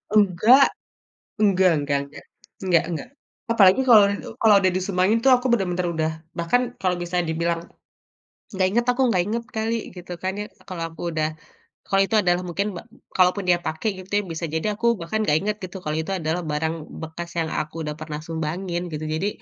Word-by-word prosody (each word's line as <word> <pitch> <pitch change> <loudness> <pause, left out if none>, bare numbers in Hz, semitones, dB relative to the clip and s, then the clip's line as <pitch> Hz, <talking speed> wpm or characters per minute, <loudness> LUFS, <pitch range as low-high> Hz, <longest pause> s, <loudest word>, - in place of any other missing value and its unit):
Enggak, 215 +7 +6 0.7
enggak 190 -3 +4
enggak 145 -1 0
enggak, 140 - -13 0.4
enggak 175 -2 +3
enggak. 170 +8 -5 0.4
Apalagi 205 +2 +6
kalau 215 -3 +9 0.4
kalau 215 -2 +6
udah 185 -1 +3
disumbangin 190 +3 +1
tuh 265 - +6
aku 250 +1 -1
bener-bener 180 -4 0
udah 160 0 0 0.3
bahkan 170 +9 +2 0.2
kalau 180 -1 +1
bisa 175 +1 -1
dibilang 170 +1 -2 0.9
nggak 190 0 0
inget 235 +2 +1
aku, 245 +2 +2
nggak 180 -2 +2
inget 230 +2 -2
kali 225 0 -1 0.2
gitu 180 0 -8
kan 190 0 -1
ya. 210 - -3 0.2
Kalau 175 -3 -5
aku 165 - -12
udah 155 -1 +1 0.6
kalau 195 0 +3
itu 220 - -1
adalah 175 -1 +2
mungkin 195 +4 -2
ba - - -6 0.4
kalaupun 185 +2 +3
dia 175 - +5
pake 160 +7 -3 0.2
gitu 190 - -21
ya - - -10
bisa 165 +1 -3
jadi 205 +6 -1
aku 235 0 +3
bahkan 215 +6 -1
gak 150 -4 +3
inget 210 +1 -2
gitu 185 0 -7
kalau 155 -2 -3
itu 160 +5 -2
adalah 170 0 -1
barang 155 +2 -1 0.3
bekas 170 +2 -7
yang 160 -1 -1
aku 155 +2 -4
udah 150 0 -4
pernah 155 -1 -6
sumbangin 170 +3 -3
gitu. 155 +1 -4
Jadi 160 +6 -1
180 Hz, 185 wpm, -23 LUFS, 160-205 Hz, 0.9 s, kalau